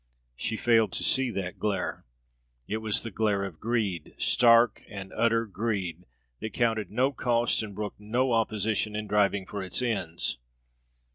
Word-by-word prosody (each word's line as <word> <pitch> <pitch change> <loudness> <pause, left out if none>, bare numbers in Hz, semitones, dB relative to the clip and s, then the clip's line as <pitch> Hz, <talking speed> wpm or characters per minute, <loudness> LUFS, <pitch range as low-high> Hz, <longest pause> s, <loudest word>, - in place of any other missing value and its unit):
She 110 - -3
failed 115 -4 +3
to - - -1
see 130 -1 +3
that 95 -4 -4
glare. 100 -3 -2 0.6
It 110 - -1
was 110 -2 0
the 115 - -5
glare 100 -1 +1
of 95 -5 -6
greed; 105 -8 -2
stark 115 -2 +4
and 95 -2 -8
utter 115 -1 +2
greed, 95 -5 -3 0.3
that 110 - -5
counted 115 -3 +1
no 130 +6 +2
cost 120 -3 +1
and 105 -3 -7
brooked 105 0 -5
no 120 +5 0
opposition 110 -1 0
in 105 0 -3
driving 100 -1 +2
for 100 +1 -5
its 95 - -2
ends. 100 - -2
110 Hz, 155 wpm, -28 LUFS, 100-115 Hz, 0.6 s, stark